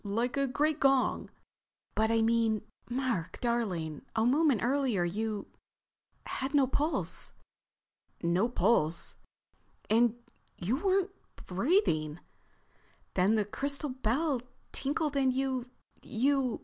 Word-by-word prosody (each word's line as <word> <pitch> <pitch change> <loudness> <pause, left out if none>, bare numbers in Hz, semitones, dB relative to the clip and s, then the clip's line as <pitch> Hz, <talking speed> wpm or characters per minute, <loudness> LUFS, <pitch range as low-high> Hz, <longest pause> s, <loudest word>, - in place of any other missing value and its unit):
Like 230 +6 -1
a 275 0 +1
great 300 +4 +1
gong." 270 -2 +2 0.6
"But—I 225 +1 +2
mean, 225 -2 +2 0.3
Mark 245 -9 -2
darling—a 220 - -1
moment 275 -2 +3
earlier 250 -7 +1
you—had 220 - -6
no 280 -2 +6
pulse." 295 +5 -1 0.9
"No 175 +7 +2
pulse?" 175 -8 +2 0.7
"And 230 +1 +4 0.4
you 205 +9 0
weren't—breathing. 340 - 0 0.9
Then 195 +4 +3
the 210 -2 +2
crystal 280 +7 -2
bell 260 +3 0 0.3
tinkled 290 +1 -1
and 265 -2 +3
you—you...." 255 0 -1
245 Hz, 90 wpm, -31 LUFS, 215-275 Hz, 0.9 s, no